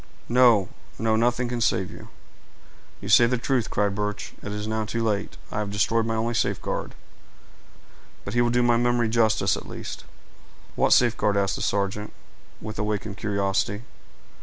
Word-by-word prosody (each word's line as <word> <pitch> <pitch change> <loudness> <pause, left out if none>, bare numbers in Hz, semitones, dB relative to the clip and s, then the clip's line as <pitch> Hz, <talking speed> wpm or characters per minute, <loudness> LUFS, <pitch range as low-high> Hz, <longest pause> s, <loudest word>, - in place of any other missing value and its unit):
No, 120 -6 +5 0.3
no—nothing 120 +2 +1
can 120 0 -3
save 95 -4 +1
you." - - -11 0.9
"You - - -7
say 120 - +6
the 125 +1 0
truth," 125 -1 0
cried 100 -1 0
Birch. 105 0 -4
"It 100 - -6
is 105 0 -4
now 110 0 -1
too 115 +2 -2
late—I 105 0 -3
have 105 -1 -2
destroyed 110 +3 +1
my 115 - -1
only 115 +2 -1
safeguard. 115 - -2 1.3
But 100 - -5
he 120 - +3
will 120 - +2
do 120 +1 +2
my 120 -1 +4
memory 120 -1 +2
justice 110 -1 +2
at - - -8
least." - - -7 0.7
"What - - +1
safeguard?" 110 -4 +3
asked 100 -1 +1
the - - -5
sergeant, 100 +1 -1 0.5
with 110 0 -7
awakened 105 -1 -2
curiosity. 100 0 -1
110 Hz, 160 wpm, -25 LUFS, 105-120 Hz, 1.3 s, say